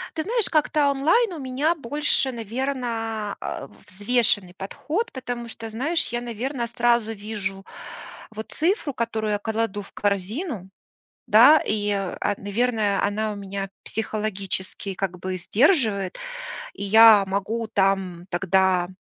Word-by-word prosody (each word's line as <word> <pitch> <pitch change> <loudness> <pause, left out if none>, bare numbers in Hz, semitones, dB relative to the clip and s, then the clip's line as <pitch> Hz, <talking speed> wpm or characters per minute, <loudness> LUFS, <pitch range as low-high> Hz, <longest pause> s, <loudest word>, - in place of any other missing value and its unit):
Ты 320 - -1
знаешь, 460 0 +1
как-то 300 -2 +2
онлайн 335 - +2
у 325 - -6
меня 270 +5 0
больше, 290 -1 0
наверное, 230 -3 -3
а, - - -5 0.2
взвешенный 205 -2 +1
подход, 310 - -3
потому 245 -2 -5
что, 225 0 -7
знаешь, 300 +10 0
я, 240 0 -2
наверно, 240 +1 -3
сразу 235 -1 +1
вижу 200 -2 -5 0.6
вот 220 0 -8
цифру, 320 - 0
которую 220 -2 -2
я 205 - 0
кладу 220 -1 -2
в 200 - -14
корзину, 205 - -2 0.6
да, 250 +9 +8
и, 205 -1 0
а, 200 +1 -1
наверное, 210 0 0
она 215 +1 -1
у - - -8
меня 195 0 -5
психологически 200 -3 -3
как 185 -1 -3
бы 185 +1 -3
сдерживает, 215 - +2 0.6
и 200 - -5
я 220 0 +8
могу 200 +4 -2
там 190 -4 0
тогда 185 0 +2
220 Hz, 130 wpm, -24 LUFS, 200-255 Hz, 0.6 s, да